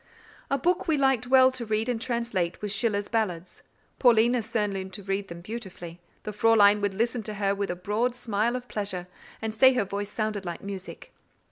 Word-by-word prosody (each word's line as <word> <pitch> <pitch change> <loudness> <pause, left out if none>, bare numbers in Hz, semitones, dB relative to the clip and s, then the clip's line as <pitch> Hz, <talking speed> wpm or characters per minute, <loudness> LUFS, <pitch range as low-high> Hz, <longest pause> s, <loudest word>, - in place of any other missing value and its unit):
A 275 - +1
book 350 +7 0
we 315 -2 +2
liked 265 -3 +2
well 260 0 +6
to 255 -2 -4
read 220 0 -1
and 240 -3 -1
translate 235 -8 -2
was 210 -1 -3
Schiller's 205 -2 0
Ballads; 185 -7 -2 0.4
Paulina 240 0 +4
soon 210 -2 -1
learned 190 -1 -5
to 205 - -8
read 195 +1 -2
them 170 0 -9
beautifully; 180 -5 -8 0.2
the 210 - -4
Fräulein 210 -1 +5
would 200 -1 -1
listen 230 +3 0
to 215 0 -6
her 200 -1 +1
with 200 0 -3
a 175 - -2
broad 210 +7 -1
smile 230 0 -1
of 250 0 -5
pleasure, 200 -5 -3 0.4
and 220 -1 -2
say 260 +4 +6
her 250 -5 +1
voice 200 +1 -4
sounded 215 -2 -2
like 175 -2 -6
music. 195 -1 -8
215 Hz, 200 wpm, -27 LUFS, 195-240 Hz, 0.4 s, well